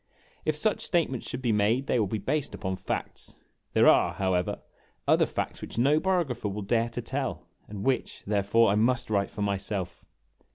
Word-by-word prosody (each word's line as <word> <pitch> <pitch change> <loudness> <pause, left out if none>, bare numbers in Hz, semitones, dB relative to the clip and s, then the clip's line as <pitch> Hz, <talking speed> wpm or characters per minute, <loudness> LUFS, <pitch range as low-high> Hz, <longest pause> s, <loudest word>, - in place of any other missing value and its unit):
If 155 - +1
such 210 +7 +1
statements 160 - 0
should 130 +1 -5
be 120 - +2
made, 110 +5 +2
they 125 - +1
will 105 - +2
be 110 - -2
based 145 +8 -2
upon 95 -1 -3
facts. - - -4 0.4
There - - +5
are, - - +5
however, 95 -2 0 0.5
other - - +4
facts - - -4
which - - -8
no 140 +6 +4
biographer 160 - 0
will 100 +1 -4
dare 115 +3 +1
to 115 - -5
tell, - - -3 0.2
and 100 -1 -6
which, 135 -1 -1
therefore, 105 +2 +3
I - - +2
must 115 +2 +1
write 100 -1 +1
for 105 - -4
myself. 100 -3 -2
110 Hz, 180 wpm, -28 LUFS, 100-130 Hz, 0.5 s, There